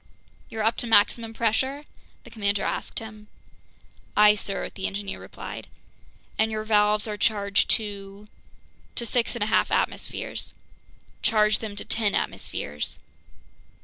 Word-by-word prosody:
"You're 220 Hz, -1 st, -3 dB
up 225 Hz, +1 st, +2 dB
to 240 Hz, -, -2 dB
maximum 225 Hz, +1 st, +4 dB
pressure?" 260 Hz, +6 st, 0 dB, 0.4 s
the -, -, -13 dB
commander 200 Hz, -2 st, 0 dB
asked -, -, -2 dB
him. 215 Hz, -1 st, -7 dB, 0.9 s
"Aye, 210 Hz, 0 st, +8 dB
sir," 200 Hz, -1 st, -3 dB
the 190 Hz, -, -3 dB
engineer 200 Hz, 0 st, -4 dB
replied. -, -, -8 dB, 0.7 s
"And 220 Hz, 0 st, +4 dB
your 215 Hz, -1 st, -2 dB
valves 210 Hz, 0 st, +3 dB
are 210 Hz, -1 st, -3 dB
charged 200 Hz, -1 st, +2 dB
to... 200 Hz, -1 st, -8 dB, 0.3 s
?" -, -, -32 dB
"To 235 Hz, -, 0 dB
six 235 Hz, +1 st, +1 dB
and 235 Hz, -, -1 dB
a 215 Hz, -, -1 dB
half -, -, +4 dB
atmospheres." -, -, -2 dB, 0.7 s
"Charge 215 Hz, -1 st, +3 dB
them 215 Hz, -2 st, -5 dB
to -, -, -5 dB
ten 215 Hz, -3 st, +1 dB
atmospheres." 75 Hz, +1 st, -3 dB
210 Hz, 140 wpm, -26 LUFS, 205-225 Hz, 0.9 s, Aye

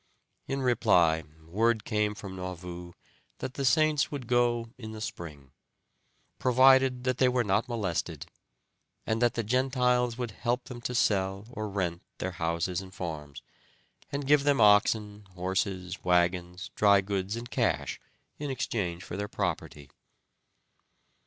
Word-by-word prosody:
In 135 Hz, 0 st, -2 dB
reply 90 Hz, -10 st, +3 dB, 0.2 s
word 110 Hz, +5 st, +1 dB
came 105 Hz, -2 st, 0 dB
from 100 Hz, -3 st, -8 dB
Nauvoo 90 Hz, -1 st, -7 dB, 0.4 s
that 130 Hz, -, -5 dB
the 140 Hz, -, -3 dB
Saints 150 Hz, +3 st, +3 dB
would 140 Hz, -4 st, -5 dB
go 120 Hz, -1 st, +1 dB
in 110 Hz, -3 st, -8 dB
the 110 Hz, -, -7 dB
spring, 75 Hz, -10 st, -7 dB, 0.9 s
provided 130 Hz, 0 st, +5 dB
that 130 Hz, -1 st, -1 dB
they 130 Hz, -, +5 dB
were 125 Hz, -1 st, +1 dB
not 105 Hz, +4 st, +1 dB
molested, 105 Hz, -8 st, -2 dB, 0.8 s
and 110 Hz, +1 st, -1 dB
that 120 Hz, -1 st, +3 dB
the 115 Hz, -, -1 dB
Gentiles 125 Hz, 0 st, +1 dB
would 120 Hz, -3 st, -3 dB
help 120 Hz, +4 st, -1 dB
them 120 Hz, -2 st, -9 dB
to 125 Hz, +1 st, -3 dB
sell 95 Hz, -2 st, +1 dB
or 110 Hz, -3 st, -4 dB
rent 90 Hz, -3 st, -2 dB, 0.2 s
their 95 Hz, -, -3 dB
houses 85 Hz, +1 st, -1 dB
and 95 Hz, -1 st, -11 dB
farms, 75 Hz, -6 st, -6 dB, 0.7 s
and 140 Hz, 0 st, -3 dB
give 145 Hz, 0 st, +4 dB
them 145 Hz, -1 st, +3 dB
oxen, 105 Hz, 0 st, +3 dB
horses, 95 Hz, 0 st, -2 dB
wagons, 90 Hz, 0 st, +1 dB
dry 100 Hz, -2 st, +5 dB
goods, 100 Hz, +1 st, -2 dB
and 120 Hz, +1 st, -7 dB
cash 85 Hz, -, 0 dB, 0.4 s
in 145 Hz, -1 st, -3 dB
exchange 95 Hz, -9 st, -2 dB
for 95 Hz, -, -7 dB
their 100 Hz, +1 st, -3 dB
property. 75 Hz, -7 st, -3 dB
105 Hz, 140 wpm, -29 LUFS, 90-125 Hz, 0.9 s, provided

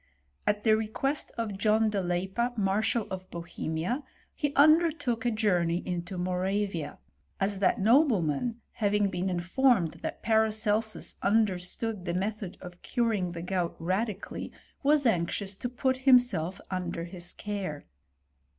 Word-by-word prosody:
At 210 Hz, 0 st, +1 dB
the 220 Hz, -2 st, +5 dB
request 220 Hz, +7 st, -1 dB
of 210 Hz, -4 st, -3 dB
John 215 Hz, +1 st, +3 dB
de 200 Hz, -2 st, 0 dB
Leippa, 190 Hz, +7 st, -1 dB
Marshal 210 Hz, +3 st, +1 dB
of 185 Hz, -1 st, -6 dB
Bohemia, 170 Hz, -, -3 dB, 0.3 s
he 290 Hz, -3 st, -1 dB
undertook 290 Hz, -6 st, +4 dB
a -, -, +4 dB
journey 180 Hz, -6 st, +1 dB
into 180 Hz, +1 st, -4 dB
Moravia; 180 Hz, -3 st, -1 dB, 0.4 s
as 195 Hz, 0 st, 0 dB
that 200 Hz, +4 st, +2 dB
nobleman, 225 Hz, -, +3 dB
having 205 Hz, -2 st, +1 dB
been 180 Hz, +1 st, -1 dB
informed 185 Hz, +1 st, +2 dB
thM -, -, -4 dB
Paracelsus 220 Hz, 0 st, +1 dB
understood 200 Hz, 0 st, 0 dB
the 175 Hz, -1 st, -2 dB
method 200 Hz, 0 st, -3 dB
of 180 Hz, -1 st, -10 dB
curing 215 Hz, -7 st, 0 dB
the 170 Hz, -1 st, -6 dB
gout 180 Hz, -2 st, -1 dB
radically, 190 Hz, +4 st, -3 dB, 0.3 s
was 290 Hz, 0 st, +3 dB
anxious 190 Hz, -1 st, 0 dB
to 245 Hz, -, -3 dB
put 260 Hz, +1 st, 0 dB
himself 245 Hz, -, +3 dB
under 175 Hz, -2 st, -3 dB
his 175 Hz, 0 st, -6 dB
ei&re. 195 Hz, -8 st, -3 dB
205 Hz, 130 wpm, -29 LUFS, 180-230 Hz, 0.4 s, the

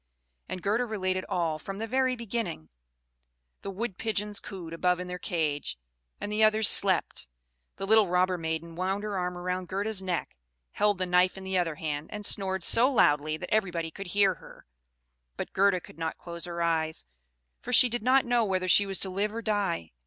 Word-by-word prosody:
And 185 Hz, -, -5 dB
Gerda 225 Hz, +5 st, +1 dB
related 185 Hz, -3 st, -2 dB
all, 165 Hz, -3 st, -1 dB
from 195 Hz, +4 st, -7 dB
the 220 Hz, -, -3 dB
very 255 Hz, +2 st, +1 dB
beginning: 230 Hz, -, -4 dB, 0.9 s
the -, -, -6 dB
Wood 195 Hz, 0 st, -4 dB
pigeons 210 Hz, -1 st, -2 dB
cooed 175 Hz, -5 st, -8 dB
above 180 Hz, +1 st, +1 dB
in 180 Hz, -, -4 dB
their 180 Hz, 0 st, -6 dB
cage, 150 Hz, -, -2 dB, 0.4 s
and 205 Hz, -, -5 dB
the 215 Hz, +1 st, +2 dB
others 215 Hz, 0 st, +5 dB
slept. 190 Hz, -, +3 dB, 0.5 s
The 195 Hz, -, -5 dB
little 215 Hz, 0 st, +5 dB
robber 180 Hz, +1 st, +2 dB
maiden 160 Hz, +1 st, -3 dB
wound 190 Hz, +3 st, -2 dB
her 210 Hz, -1 st, -3 dB
arm 180 Hz, -1 st, -2 dB
round 180 Hz, +1 st, -3 dB
Gerda's 200 Hz, +2 st, -1 dB
neck, 185 Hz, -2 st, -3 dB, 0.4 s
held 205 Hz, -1 st, +1 dB
the 185 Hz, -, -1 dB
knife 180 Hz, +1 st, +3 dB
in 190 Hz, -, -8 dB
the 190 Hz, 0 st, -3 dB
other 165 Hz, -3 st, -1 dB
hand, 150 Hz, -1 st, -4 dB
and 210 Hz, 0 st, -6 dB
snored 190 Hz, -3 st, 0 dB
so 235 Hz, +8 st, +4 dB
loud 150 Hz, -, +4 dB
that 155 Hz, +7 st, -4 dB
everybody 175 Hz, -6 st, 0 dB
could 195 Hz, +4 st, -8 dB
hear 195 Hz, +1 st, +3 dB
her; -, -, -15 dB, 0.7 s
but -, -, -5 dB
Gerda 195 Hz, -1 st, +3 dB
could 165 Hz, -, -16 dB
not 160 Hz, -1 st, -3 dB
close 170 Hz, -1 st, -5 dB
her 170 Hz, -1 st, -3 dB
eyes, 160 Hz, -, -1 dB, 0.6 s
for 250 Hz, -, -6 dB
she 250 Hz, -, +7 dB
did 240 Hz, 0 st, -3 dB
not 260 Hz, +3 st, +4 dB
know 240 Hz, -1 st, +2 dB
whether 185 Hz, -3 st, -1 dB
she 200 Hz, +2 st, +6 dB
was 195 Hz, -1 st, 0 dB
to 190 Hz, -, 0 dB
live 200 Hz, +3 st, -1 dB
or 230 Hz, -, -4 dB
die. 200 Hz, -, -1 dB
190 Hz, 195 wpm, -28 LUFS, 170-210 Hz, 0.9 s, she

